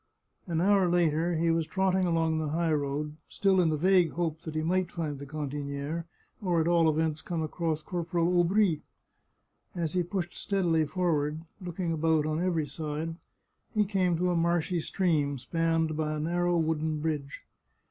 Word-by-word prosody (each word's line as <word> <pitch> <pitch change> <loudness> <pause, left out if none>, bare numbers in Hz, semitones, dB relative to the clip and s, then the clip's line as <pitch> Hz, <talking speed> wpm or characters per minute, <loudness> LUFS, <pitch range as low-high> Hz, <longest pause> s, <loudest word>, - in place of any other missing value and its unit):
An 165 -2 0
hour 195 -1 +4
later 170 0 +2
he 165 +1 +2
was 165 -1 0
trotting 190 -1 +1
along 165 -1 +1
the 155 - -1
high 160 +2 +1
road, 150 +1 -2
still 190 -2 +3
in 170 - +3
the 155 - 0
vague 180 0 +4
hope 165 -2 -2
that 160 -2 -7
he 155 - 0
might 180 +1 0
find 155 -5 -3
the 140 - -8
cantiniere, 145 +2 -4 0.4
or 180 -4 +1
at 160 - +1
all 170 -2 +4
events 155 0 0
come 165 -2 -3
across 155 0 -2
Corporal 175 -1 -1
Aubry. 175 -2 +3 0.9
As 165 -3 -2
he 180 - +2
pushed 175 0 -3
steadily 170 -6 +1
forward, 155 -3 0 0.2
looking 175 -1 -3
about 160 -1 +2
on 155 +1 -1
every 170 -4 +1
side, 155 +2 -4 0.6
he 210 -1 +3
came 185 -4 +1
to 180 +1 +1
a - - +1
marshy 170 +1 +1
stream, 155 -5 0
spanned 165 +3 0
by 155 0 -1
a - - -3
nar 175 +3 0
row 175 0 +2
wooden 160 -1 0
bridge. 150 -3 -3
165 Hz, 175 wpm, -29 LUFS, 155-175 Hz, 0.9 s, hour